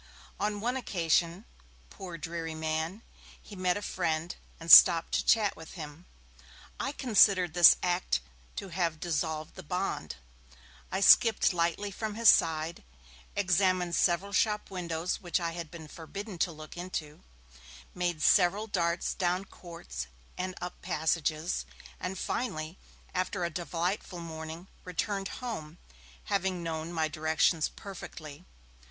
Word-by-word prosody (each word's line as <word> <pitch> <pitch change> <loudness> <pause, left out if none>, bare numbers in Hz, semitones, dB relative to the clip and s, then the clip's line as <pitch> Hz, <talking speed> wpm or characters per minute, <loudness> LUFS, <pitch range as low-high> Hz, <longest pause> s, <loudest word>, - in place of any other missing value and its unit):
On 205 0 -1
one 245 +3 0
occasion, 175 -4 0 0.5
poor 180 -3 -8
dreary 165 0 -5
man, 160 +6 -3 0.4
he 205 - -12
met 185 -1 +1
a 205 - -6
friend 165 -3 -2 0.2
and 165 0 -1
stopped 165 -1 +9
to - - +1
chat 215 -4 +3
with 160 - -11
him. 155 +1 -9 0.7
I 275 - -1
considered 200 - +4
this 175 -1 +8
act 180 - +1 0.4
to 195 - -5
have 170 -3 -1
dissolved 155 -1 -2
the - - -9
bond; 180 - -3 0.8
I 190 - -1
skipped 220 -1 +6
lightly 175 +4 0
from 215 +1 -4
his 230 0 +6
side, 165 -2 +2 0.5
examined 185 -2 +2
several 180 +4 +1
shop 210 0 +1
windows 170 -2 -3
which 175 -1 0
I 170 -1 -2
had 170 -2 -6
been 160 -2 -10
forbidden 190 +5 -8
to 175 - +1
look 155 -1 -11
into, 175 -4 -5 0.7
made 175 -3 -2
several 195 +3 +4
darts 175 -5 -1
down 180 +1 0
courts 170 - -8 0.3
and 185 0 -4
up 180 0 -7
passages, 160 -1 -1 0.4
and 185 +1 -4
finally, 160 -6 -3 0.3
after 185 0 -1
a 170 - -3
delightful 175 +2 -3
morning, 160 +1 -7 0.2
returned 195 +2 -2
home, 175 -12 -6 0.5
having 190 -3 -1
known 160 0 -4
my 160 -2 0
directions 155 +1 +1
perfectly. 165 -5 -9
175 Hz, 135 wpm, -30 LUFS, 160-190 Hz, 0.8 s, stopped